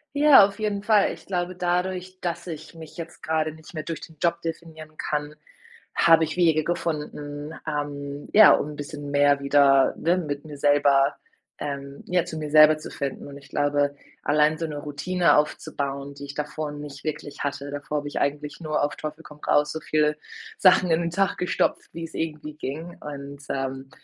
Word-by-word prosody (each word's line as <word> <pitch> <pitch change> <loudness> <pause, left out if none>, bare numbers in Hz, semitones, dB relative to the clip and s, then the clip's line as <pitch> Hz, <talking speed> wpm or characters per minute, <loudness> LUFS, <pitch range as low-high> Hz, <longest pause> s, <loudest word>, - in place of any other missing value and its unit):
Ja, 285 -6 +8
auf 200 +2 -2
jeden 210 -2 -1
Fall. 210 -1 +4
Ich - - -17
glaube 180 -1 -2
dadurch, 180 +1 -2
dass 170 0 -3
ich 155 0 -8
mich 160 -2 -11
jetzt 170 -1 -8
grade 155 +1 0
nicht 160 +2 -15
mehr 155 0 -4
durch 165 -1 -5
den 160 - -12
Job 170 0 +1
definieren 160 -2 -7
kann, 150 0 -3 0.6
habe 165 -1 +6
ich 155 - -5
Wege 160 -3 +3
gefunden, 150 -3 -4
ähm, 145 -1 -4
ja, 215 - +9
um 150 - -1
‘n 150 - -9
bisschen 145 -1 -7
mehr 145 0 +4
wieder, 140 -1 +4
ne, 170 +2 +2
mit 145 -4 -4
mir 150 -2 -9
selber, 145 -1 +4 0.4
ähm 140 -1 -6
ja, 180 -1 +1
zu 160 - -6
mir 150 -1 -4
selber 155 0 +8
zu 155 - -9
finden 140 0 -5
und 140 - -10
ich 140 -1 -14
glaube, 145 0 +1 0.3
allein 150 +1 +3
so 165 - -2
‘ne 150 -2 -5
Routine 150 +5 +1
aufzubauen, 140 -1 -2
die 140 0 -9
ich 140 - -8
davor 150 0 -4
nicht 145 -1 -9
wirklich 150 -2 -5
hatte, 145 0 -3
davor 145 +1 -3
habe 145 0 -4
ich - - -4
eigentlich 145 +1 -2
nur 155 -2 -1
auf 145 - -1
Teufel 155 +1 -6
komm 150 -1 -13
raus, 150 0 +3
so 160 - -4
viele 150 -1 +1 0.4
Sachen 185 -1 +5
in 165 +1 +3
den 170 - -1
Tag 195 +2 +1
gestopft, 180 - 0
wie's 165 -1 -7
irgendwie 150 -2 -4
ging. 155 +4 -6
Und, 140 -1 -8
ähm, 135 0 -3
150 Hz, 190 wpm, -25 LUFS, 145-165 Hz, 0.6 s, ja